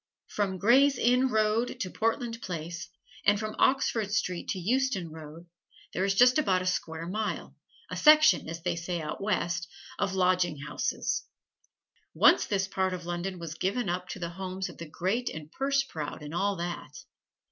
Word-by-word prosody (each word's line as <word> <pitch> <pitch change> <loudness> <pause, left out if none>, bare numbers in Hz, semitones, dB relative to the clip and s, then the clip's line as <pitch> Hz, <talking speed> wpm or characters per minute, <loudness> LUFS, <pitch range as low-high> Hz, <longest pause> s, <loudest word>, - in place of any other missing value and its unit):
From 195 -2 -2
Gray's 265 +8 +5
Inn 250 +2 +3
Road 220 0 +1
to 185 - -3
Portland 230 +1 -1
Place, 170 0 -5 0.3
and 205 0 +4
from 215 0 -4
Oxford 230 -6 +2
Street 180 -4 -1
to - - -2
Euston 200 -3 0
Road, 160 +1 -10 0.5
there 185 - 0
is 195 0 +1
just 250 +6 +6
about 185 -10 +2
a - - -6
square 165 -3 -2
mile 210 +5 -3 0.4
a - - -3
section, 310 - +6
as 165 0 -6
they - - 0
say 175 +1 -3
out 155 +3 -5
West 180 -3 -1 0.3
of 190 - 0
lodging 180 -3 +2
houses. 145 +2 -2 0.9
Once - - +5
this 195 -2 0
part 190 -1 0
of 175 -1 -9
London 175 +2 -3
was 165 -2 -6
given 195 +5 -1
up 180 +1 -2
to - - -5
the 170 -2 -4
homes 190 +1 -5
of - - -13
the 165 -2 -7
great 205 +10 -1
and 155 -1 -8
purse 275 +3 +1
proud 155 - -6
and 150 +1 -7
all 200 +3 +1
that. 175 0 -6
185 Hz, 175 wpm, -29 LUFS, 170-220 Hz, 0.9 s, just